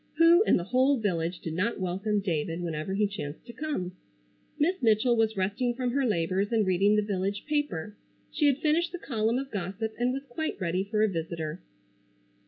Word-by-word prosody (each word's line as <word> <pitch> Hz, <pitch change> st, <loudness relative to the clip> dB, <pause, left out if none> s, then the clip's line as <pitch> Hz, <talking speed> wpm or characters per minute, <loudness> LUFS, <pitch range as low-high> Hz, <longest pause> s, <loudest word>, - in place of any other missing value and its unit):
Who 335 Hz, +2 st, +7 dB
in -, -, +5 dB
the 175 Hz, -, -2 dB
whole 260 Hz, +7 st, +3 dB
village 175 Hz, -5 st, -1 dB
did 160 Hz, -, -4 dB
not 205 Hz, +8 st, -1 dB
welcome 195 Hz, +3 st, -1 dB
David 165 Hz, -3 st, -2 dB
whenever 165 Hz, +2 st, -3 dB
he 210 Hz, +1 st, +3 dB
chanced 160 Hz, -8 st, -6 dB
to 235 Hz, -, -10 dB
come? 250 Hz, -, -3 dB, 0.7 s
Miss 355 Hz, +6 st, +1 dB
Mitchell 230 Hz, +1 st, +4 dB
was 220 Hz, -2 st, +1 dB
resting 205 Hz, +6 st, 0 dB
from 250 Hz, -1 st, -1 dB
her 270 Hz, 0 st, +1 dB
labors 190 Hz, +1 st, 0 dB
and 220 Hz, -3 st, +2 dB
reading 195 Hz, +3 st, +3 dB
the 210 Hz, -, +2 dB
village 200 Hz, 0 st, -2 dB
paper. 215 Hz, -, -2 dB, 0.4 s
She 295 Hz, -, +2 dB
had 275 Hz, -2 st, +3 dB
finished 320 Hz, +3 st, +1 dB
the -, -, -3 dB
column 230 Hz, -6 st, 0 dB
of 270 Hz, 0 st, -4 dB
gossip 200 Hz, +3 st, -3 dB
and 245 Hz, +1 st, +2 dB
was 270 Hz, +1 st, -4 dB
quite 315 Hz, +1 st, -4 dB
ready 185 Hz, 0 st, 0 dB
for 210 Hz, +1 st, 0 dB
a -, -, +5 dB
visitor. 165 Hz, -, -4 dB
210 Hz, 190 wpm, -28 LUFS, 185-255 Hz, 0.7 s, Who